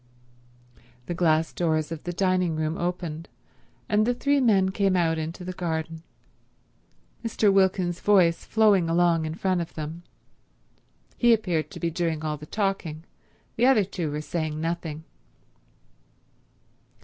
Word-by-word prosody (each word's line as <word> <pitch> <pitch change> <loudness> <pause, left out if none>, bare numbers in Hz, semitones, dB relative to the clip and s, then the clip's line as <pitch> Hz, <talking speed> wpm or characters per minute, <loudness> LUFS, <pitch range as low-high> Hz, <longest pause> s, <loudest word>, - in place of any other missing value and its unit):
The 175 - -3
glass 165 -2 +1
doors 160 -2 0
of 160 -2 -6
the 175 - -2
dining 185 -2 +1
room 155 +1 -1
opened, 175 -2 -4 0.6
and 210 0 +2
the 245 +2 +1
three 285 +3 +2
men 195 -7 +3
came 195 -1 +1
out 165 -2 +1
into 165 +3 -5
the 185 - -4
garden, 160 -2 -3 1.2
Mr. 215 -3 +2
Wilkins's 185 -2 +2
voice 180 -5 +3
flowing 205 -6 +3
along 170 -1 +2
in 155 0 -4
front 185 0 0
of 170 - -7
them. 155 +2 -6 1.2
He 240 -1 +6
appeared 180 -8 -2
to - - -9
be 170 - -1
doing 165 -2 -2
all 155 -1 -2
the 150 +1 -11
talking; 195 -6 -2 0.5
the 240 +3 +4
other 255 -6 +5
two 180 -4 -4
were 150 +1 -3
saying 155 -1 -3
nothing. 165 -1 -4
175 Hz, 140 wpm, -25 LUFS, 160-195 Hz, 1.2 s, He